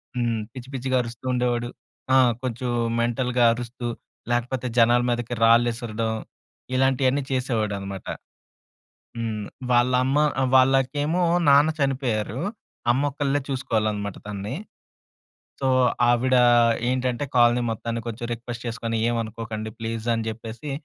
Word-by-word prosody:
హ్మ్. 115 -2 0
పిచ్చి 130 0 -9
పిచ్చిగా 130 0 0
అరుస్తూ 115 +1 -8
ఉండేవాడు. 120 -1 0 0.5
ఆ! - - +7 0.2
కొంచెం 125 0 -3 0.3
మెంటల్‌గా 120 +1 +1
అరుస్తూ, 120 0 -5 0.4
లేకపోతే 125 +1 -1
జనాల 120 +1 +5
మీదకి 120 0 -2
రాళ్ళిసరడం 115 -1 +2 0.6
ఇలాంటియన్నీ 135 +1 +2
చేసేవాడనమాట. 105 -7 -2 1.1
హ్మ్. 110 -2 -3 0.3
వాళ్ళమ్మ, 125 +3 +3 0.2
ఆహ్, 130 - +2
వాళ్ళకేమో 135 +6 +2 0.3
నాన్న 145 +3 +6
చనిపోయారు. 130 -4 -1 0.5
అమ్మొకళ్ళే 145 +2 +1
చూసుకోవాలనమాట 110 -6 -1
తనని. 105 +5 -5 1.0
సో, 135 - 0 0.4
ఆవిడా 125 +1 +4 0.5
ఏంటంటే, 130 +1 0
కోలనీ 120 0 +4
మొత్తాన్ని 115 +1 -3
కొంచెం 115 +1 -5
రిక్వెస్ట్ 120 +1 -6
చేసుకొని, 115 -1 -3
ఏవనుకోకండి 110 -1 -3
ప్లీజ్ 115 0 -4
అని 115 -1 -2
చెప్పేసి, 115 +5 -7
120 Hz, 105 wpm, -24 LUFS, 115-130 Hz, 1.1 s, ఆ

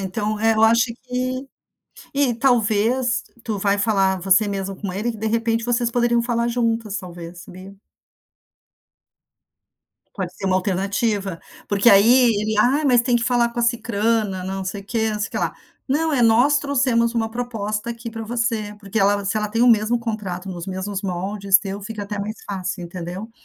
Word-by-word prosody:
então 210 +3 -2
é, 225 0 +3
eu 220 - +2
acho 230 +2 +5 0.2
que 255 +1 -3 0.7
e 275 -4 +2
talvez, 235 0 +2 0.2
tu 220 -3 -2
vai 200 +1 +1
falar 195 -3 +2
você 190 +3 +4
mesmo 195 -1 -3
com 195 -3 -5
ele 220 +5 -2
que, - - -9
de 220 +1 -4
repente, 230 0 0
vocês 240 -1 0
poderiam 240 0 +2
falar 235 0 0
juntas, 230 -3 -1
talvez, 175 -1 -9
sabia. 185 +2 -12 2.4
Pode 185 -3 -4
ser 195 - -5
uma 185 0 +3
alternativa, 195 0 -1 0.3
porque 205 +3 +4
aí 230 +4 +6
ele: 215 0 -1
"Ah, 275 +7 +3
mas 245 -2 +5
tem 245 -1 +2
que 235 - -1
falar 240 -1 +2
com 235 - -8
a - - +1
Sicrana. 225 -4 0
Não 190 0 -4
sei 195 +1 -4
o - - -14
quê, 220 +1 -1
não 210 - -3
sei 215 - -2
que - - -3
lá", - - -1 0.3
não, 315 +4 +1
é: 250 -4 +2
"Nós 245 +6 +5
trouxemos 250 -4 +1
uma 225 -1 0
proposta 225 -2 -3
aqui 230 0 -7
para 225 0 -6
você", 225 -2 -2
porque 200 +2 -3
ela 200 0 +2
se 205 +3 -1
ela 210 -1 -1
tem 230 +3 0
o 245 - +6
mesmo 225 +1 +3
contrato 200 -5 -4
nos 175 -1 -6
mesmos 190 +1 -4
moldes 195 +1 +1
teu, 195 0 -6
fica 210 0 -6
até 205 0 -5
mais 210 +2 -4
fácil, 185 -2 -4
entendeu. 180 +5 -7
220 Hz, 185 wpm, -21 LUFS, 195-235 Hz, 2.4 s, aí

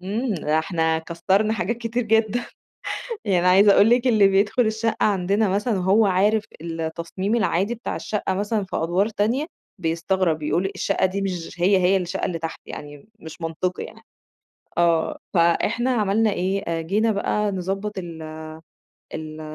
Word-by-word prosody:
إمم، 210 +5 -2
ده 155 -1 0
إحنا 160 -1 0
كسَّرنا 190 +6 0
حاجات 220 +2 -1
كتير 235 +1 -2
جدًا، 225 +1 +1 0.8
يعني 180 -3 +2
عايزة 195 +3 +6
أقول 205 +3 +6
لِك 245 +1 +3
اللي 215 -5 +5
بيدخل 205 +5 +2
الشقة 220 +1 0
عندنا 200 +1 +1
مثلًا 210 +4 0
وهو 195 +4 +4
عارف 205 +3 +2 0.2
التصميم 170 +5 -3
العادي 205 0 +1
بتاع 235 - -5
الشقة 205 -3 -2
مثلًا 205 +2 -1
في - - -6
أدْوار 180 +6 +1
تانية، 225 +8 0 0.3
بيستغرب، 165 0 0
يقول: 180 +6 0
"الشقة 195 - +1
دي 195 +2 -2
مش 180 -4 -4
هي 190 +2 +5
هي 185 +1 +3
الشقة 185 +1 -3
اللي 170 -2 -3
تحت، 165 0 -5
يعني 145 +4 -9
مش 160 -1 -11
منطقي 165 +3 -2
يعني." - - -11 0.8
آه، 170 -2 +2 0.2
فإحنا 205 +8 +2
عملنا 215 -1 +2
إيه، 195 +2 -1
آآ، 165 -1 -1
جينا 210 +7 +1
بقى 210 0 0
نضبّط 195 +3 -3
ال 170 -3 -6 0.9
ال 155 0 -6
195 Hz, 155 wpm, -23 LUFS, 170-215 Hz, 0.9 s, عايزة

